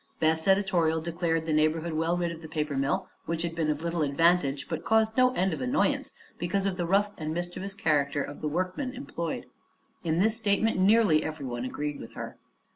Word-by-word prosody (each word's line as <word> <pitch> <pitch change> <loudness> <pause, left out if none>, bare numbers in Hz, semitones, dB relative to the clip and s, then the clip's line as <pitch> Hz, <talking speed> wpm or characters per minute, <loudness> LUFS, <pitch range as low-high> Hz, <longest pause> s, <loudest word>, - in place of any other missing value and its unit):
Beth's 160 +1 +1
editorial 185 -5 +3
declared 165 0 -1
the 160 - 0
neighborhood 155 +2 +1
well 165 +2 +1
rid 175 -1 -1
of 165 -1 -8
the 160 - -8
paper 155 -2 -2
mill, 135 +1 0 0.2
which 165 0 -1
had 170 -1 -2
been 165 -2 -1
of 150 +1 -1
little 170 -1 -1
advantage 145 -1 +2
but 160 - -3
had - - -16
caused 220 0 +3
no 255 0 +5
end 185 0 +1
of 150 - -4
annoyance 125 -1 +1 0.3
because 185 +3 0
of 195 -2 0
the 175 -2 -2
rough 200 +3 +3
and 155 0 -3
mischievous 175 +3 -3
character 145 -7 +1
of 145 - -8
the 155 - -1
workmen 185 - -2
employed. 245 - -4 0.6
In 160 -1 0
this 215 +5 +3
statement 220 -1 +1
nearly 195 -5 +5
everyone 130 -6 -4
agreed 145 +3 -4
with - - -10
her. - - -7
170 Hz, 200 wpm, -28 LUFS, 155-190 Hz, 0.6 s, no